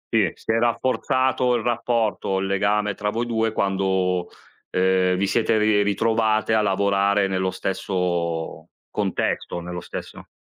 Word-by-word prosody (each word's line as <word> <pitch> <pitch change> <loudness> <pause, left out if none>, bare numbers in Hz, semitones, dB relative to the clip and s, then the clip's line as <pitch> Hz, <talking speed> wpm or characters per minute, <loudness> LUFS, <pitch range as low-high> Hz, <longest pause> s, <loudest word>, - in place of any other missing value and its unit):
Sì, 100 -7 +3
si - - -4
è 115 - +2
rafforzato 125 +1 +1
il 115 - -1
rapporto, 115 -5 0
il 95 - -1
legame 100 +1 +1
tra 105 +2 -2
voi 115 +3 -2
due 115 -1 0
quando, 95 -3 0 0.4
ehm, 95 0 +2
vi 100 - +1
siete 110 +2 +1
ri 105 -1 +3
ritrovate 110 +2 +1
a 110 - +4
lavorare 100 0 +2
nello 95 -1 0
stesso 85 -4 -2 0.2
contesto, 85 - -2
nello 90 0 -6
stesso - - -8
100 Hz, 140 wpm, -23 LUFS, 95-110 Hz, 0.4 s, a